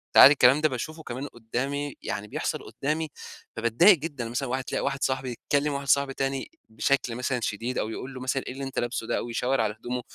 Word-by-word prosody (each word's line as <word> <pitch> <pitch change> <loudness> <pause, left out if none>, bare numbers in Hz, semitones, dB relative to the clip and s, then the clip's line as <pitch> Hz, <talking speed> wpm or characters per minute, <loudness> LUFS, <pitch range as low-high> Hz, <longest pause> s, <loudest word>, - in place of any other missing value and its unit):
فعادي 140 - +11
الكلام 135 +2 +5
ده 155 - +4
باشوفه 155 +6 -5
كمان 130 +2 -5
قُدّامي، 135 +5 -3
يعني 105 +1 -4
بيحصل - - -3
قدامي، 155 +3 -1 0.5
فباتضايق 120 - +5
جدًا. 145 -6 -5
مثلًا 125 +2 -2
واحد 130 +1 -1
تلاقى - - -2
واحد 135 - -1
صاحبي 130 -2 -1 0.2
بيكلّم 145 0 +3
واحد 140 0 -4
صاحبي 140 0 +3
تاني 135 - -2 0.2
بشكل 120 +2 0
مثلًا 125 +1 -1
شديد، 115 +4 -2
أو 110 - -1
يقول 130 +4 -6
له 130 - -8
مثلًا: 130 +1 -1
"إيه - - -4
اللي 135 +1 -6
أنت 135 -1 -3
لابسه 120 -1 -2
ده." - - 0
أو 120 - -4
يشاور 125 +2 +1
على 105 -1 0
هدومه، 125 +2 -3
130 Hz, 215 wpm, -27 LUFS, 120-140 Hz, 0.5 s, فعادي